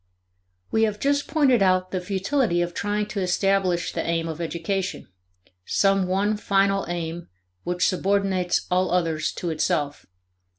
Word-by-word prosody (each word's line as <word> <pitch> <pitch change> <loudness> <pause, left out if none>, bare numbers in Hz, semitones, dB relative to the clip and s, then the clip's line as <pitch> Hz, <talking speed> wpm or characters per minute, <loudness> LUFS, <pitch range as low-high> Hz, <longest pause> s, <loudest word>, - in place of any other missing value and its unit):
We 220 - +2
have 210 -2 +1
just 285 +1 +1
pointed 270 -8 +3
out 185 -1 +2
the 185 - -2
futility 195 0 0
of 175 0 -5
trying 210 +2 -1
to 210 - -3
establish 185 -1 +1
the - - -2
aim 165 0 -1
of 160 +1 -5
education 180 +3 -3 0.6
some 195 - +2
one 200 +3 +1
final 195 -1 +1
aim 170 0 -4 0.4
which 180 +1 +1
subordinates 190 -1 +1
all 185 +1 +2
others 165 -3 0
to 175 - -3
itself. 145 -2 -1
185 Hz, 140 wpm, -24 LUFS, 175-200 Hz, 0.6 s, pointed